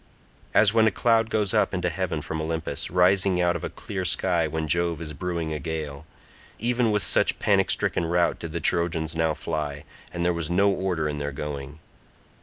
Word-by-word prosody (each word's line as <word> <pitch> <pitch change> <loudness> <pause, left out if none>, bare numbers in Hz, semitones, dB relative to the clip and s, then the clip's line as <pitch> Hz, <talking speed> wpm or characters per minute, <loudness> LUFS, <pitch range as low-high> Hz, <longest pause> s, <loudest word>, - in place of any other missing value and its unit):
As 105 -1 +6
when 110 -1 +5
a - - +3
cloud 115 -1 +2
goes 105 -4 0
up - - +2
into 90 -1 -1
heaven 80 -4 -2
from 80 +1 -4
Olympus, 80 +1 -3
rising 90 +1 +3
out 90 0 +2
of 85 - -5
a - - -2
clear 95 -2 -5
sky 85 -1 +1
when 80 0 -3
Jove 85 0 +1
is 75 -2 -6
brewing 85 0 -3
a 75 - -3
gale—even 80 - -4
with 105 -1 +1
such - - +2
panic - - +2
stricken 85 - +1
rout 85 +1 +1
did 85 - -6
the 85 - -3
Trojans 80 -1 0
now 80 -1 +1
fly, 75 -2 -4 0.3
and 85 0 -3
there 90 - +3
was 85 -2 -2
no 100 +3 +3
order 90 -5 -1
in 75 -1 -3
their 70 0 -3
going. 70 0 -6
85 Hz, 195 wpm, -25 LUFS, 80-95 Hz, 0.3 s, As